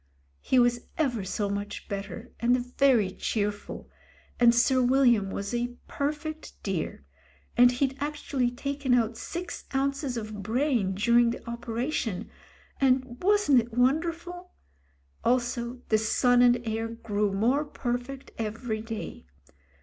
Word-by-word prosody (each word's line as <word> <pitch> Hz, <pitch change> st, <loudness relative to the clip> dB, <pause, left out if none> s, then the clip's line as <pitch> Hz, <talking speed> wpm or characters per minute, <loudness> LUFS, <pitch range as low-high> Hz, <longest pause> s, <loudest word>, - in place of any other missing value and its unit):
He 260 Hz, -, +1 dB
was 240 Hz, -1 st, +3 dB
ever 245 Hz, -9 st, 0 dB
so 200 Hz, +2 st, -2 dB
much 200 Hz, +1 st, -4 dB
better, 205 Hz, +4 st, -6 dB
and 245 Hz, +1 st, +3 dB, 0.2 s
very 245 Hz, -9 st, +4 dB
cheerful; 205 Hz, +1 st, -3 dB, 0.5 s
and 240 Hz, -1 st, +6 dB
Sir 255 Hz, +2 st, +4 dB
William 245 Hz, -5 st, +4 dB
was 200 Hz, +3 st, -4 dB
a 240 Hz, 0 st, -2 dB
perfect 305 Hz, +2 st, -4 dB
dear; 185 Hz, -, -3 dB, 0.5 s
and 245 Hz, +1 st, +7 dB
he'd 265 Hz, +1 st, 0 dB
actually 290 Hz, -3 st, -1 dB
taken 275 Hz, +1 st, -1 dB
out 230 Hz, -1 st, +1 dB
six 345 Hz, +7 st, -6 dB
ounces 275 Hz, -1 st, 0 dB
of 215 Hz, -2 st, -5 dB
brain 225 Hz, -3 st, 0 dB
during 235 Hz, +4 st, +4 dB
the 235 Hz, -, -6 dB
operation, 235 Hz, -2 st, -3 dB, 0.5 s
and 255 Hz, -2 st, +1 dB
wasn't 390 Hz, -9 st, +4 dB
it 235 Hz, 0 st, -4 dB
wonderful. 335 Hz, +7 st, 0 dB, 0.7 s
Also 245 Hz, 0 st, 0 dB
the 215 Hz, -, +4 dB
son 245 Hz, +3 st, +3 dB
and 240 Hz, -1 st, +4 dB
heir 225 Hz, +1 st, -1 dB
grew 210 Hz, -3 st, -1 dB
more 240 Hz, +9 st, +2 dB
perfect 255 Hz, -1 st, -4 dB
every 220 Hz, 0 st, -3 dB
day. 225 Hz, -, -7 dB
245 Hz, 125 wpm, -28 LUFS, 220-270 Hz, 0.7 s, and